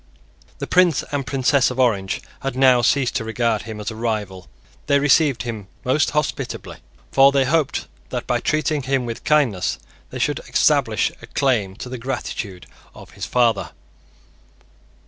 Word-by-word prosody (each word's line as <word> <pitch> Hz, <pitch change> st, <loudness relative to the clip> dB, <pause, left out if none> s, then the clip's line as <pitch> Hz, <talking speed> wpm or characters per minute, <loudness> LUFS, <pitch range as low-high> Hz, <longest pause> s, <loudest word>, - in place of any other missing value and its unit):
The -, -, -4 dB
Prince 180 Hz, -4 st, +3 dB
and 140 Hz, -2 st, -2 dB
Princess 135 Hz, 0 st, +2 dB
of 130 Hz, 0 st, -6 dB
Orange 100 Hz, -7 st, +1 dB, 0.2 s
had 135 Hz, -1 st, -4 dB
now 130 Hz, -2 st, +5 dB
ceased 130 Hz, +2 st, +2 dB
to 120 Hz, -, -3 dB
regard 110 Hz, -1 st, 0 dB
him 110 Hz, -1 st, -8 dB
as 105 Hz, +2 st, -4 dB
a -, -, -8 dB
rival. 105 Hz, -5 st, -3 dB, 0.4 s
They 140 Hz, -, +4 dB
received 140 Hz, -2 st, +3 dB
him 110 Hz, -5 st, -6 dB, 0.2 s
most 130 Hz, +2 st, +2 dB
hospitably; 150 Hz, 0 st, -3 dB, 0.3 s
for 135 Hz, 0 st, +6 dB
they 135 Hz, -1 st, +2 dB
hoped 155 Hz, +1 st, 0 dB, 0.2 s
that, -, -, -4 dB
by -, -, 0 dB
treating, 155 Hz, -1 st, 0 dB
him 130 Hz, -1 st, -1 dB
with 115 Hz, 0 st, -6 dB
kindness, 125 Hz, -, +1 dB, 0.3 s
they -, -, -7 dB
should -, -, 0 dB
establish -, -, +2 dB
a -, -, -11 dB
claim 110 Hz, -9 st, 0 dB
to 120 Hz, -, -8 dB
the 125 Hz, 0 st, -6 dB
gratitude 110 Hz, -7 st, -5 dB, 0.3 s
of -, -, -13 dB
his -, -, -6 dB
father. 120 Hz, -4 st, +1 dB
125 Hz, 160 wpm, -21 LUFS, 110-140 Hz, 0.4 s, for